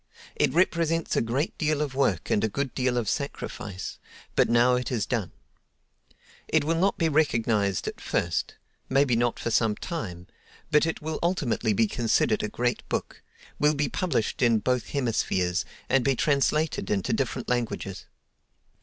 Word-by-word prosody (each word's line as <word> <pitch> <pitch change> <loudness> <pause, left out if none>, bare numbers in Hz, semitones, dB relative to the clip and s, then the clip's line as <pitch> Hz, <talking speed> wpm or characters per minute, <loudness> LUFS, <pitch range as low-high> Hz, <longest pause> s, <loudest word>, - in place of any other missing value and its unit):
It - - +2
represents 165 -1 +1
a - - +3
great 125 +7 -1
deal 155 -2 +1
of 145 -3 -2
work 130 -11 0
and 105 - +2
a 110 - +2
good 140 +4 -3
deal 125 -1 0
of 115 -3 -1
sacrifice, 105 - -4 0.4
but - - +3
now 120 +2 +5
it 125 +1 -1
is 110 -5 0
done. 110 -9 -2 1.2
It - - +2
will 160 +3 +1
not 195 +2 +2
be 165 - +2
recognized 115 - +1
at - - -5
first—maybe 125 - -1
not 120 0 +1
for 115 - -3
some 110 -1 +2
time—but 150 - -3
it 160 - -3
will 160 0 -3
ultimately 140 - +1
be 110 +3 +3
considered 110 -1 +1
a 105 - -2
great 120 +3 -1
book, - - -3 0.4
will 150 +1 +3
be 145 0 0
published 150 - -1
in 120 -3 +4
both 125 +3 0
hemispheres, 95 - 0 0.2
and 135 -2 +3
be 135 0 +2
translated 145 -2 +1
into 95 -3 0
different - - -2
languages. 115 -6 -2
125 Hz, 155 wpm, -27 LUFS, 110-150 Hz, 1.2 s, now